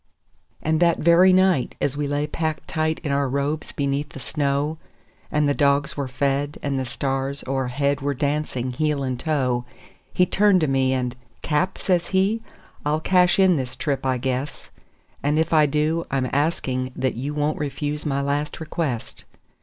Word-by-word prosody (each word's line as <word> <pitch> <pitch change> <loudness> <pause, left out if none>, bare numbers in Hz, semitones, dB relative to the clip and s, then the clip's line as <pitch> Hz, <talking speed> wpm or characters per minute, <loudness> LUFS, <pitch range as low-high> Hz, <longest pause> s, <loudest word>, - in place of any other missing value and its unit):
And 160 0 +1
that 170 -1 +4
very 170 +3 +6
night, 185 -7 +3
as 140 -1 0
we 145 0 -1
lay 145 +1 0
packed 155 0 -3
tight 160 0 0
in 145 - -2
our 140 -1 +1
robes 140 +3 -2
beneath 140 +1 -1
the - - -8
snow, 145 +3 -1 0.5
And 150 -1 +2
the 145 - +3
dogs 140 -1 +2
were 140 -2 -2
fed, 140 +2 -1
and 140 -2 -1
the 130 - -3
stars 135 +2 -2
o'erhead 135 +2 0
were 140 0 -1
dancing 140 -2 -1
heel 150 +2 0
and 130 -2 -2
toe, 130 -6 0 0.5
He 180 - +3
turned 195 0 +3
to 155 - +2
me, 135 -1 +2
and 125 -1 -1 0.3
"Cap," 165 +5 0
says 175 -2 +1
he, 195 +4 +1 0.4
"I'll 150 +1 +1
cash 180 +1 +3
in 190 -3 +5
this 130 -1 -4
trip, 140 0 -2
I 130 -1 +1
guess; 130 +3 -3 0.5
And 145 +2 +1
if 160 +1 +1
I 155 -2 +5
do, 155 +3 0
I'm 135 -2 0
asking 130 -4 0
that 130 - 0
you 140 +5 -4
won't 150 +1 0
refuse 150 +1 -3
my 140 -2 -1
last 145 +3 -2
request." 155 -7 -4
145 Hz, 175 wpm, -23 LUFS, 135-155 Hz, 0.5 s, very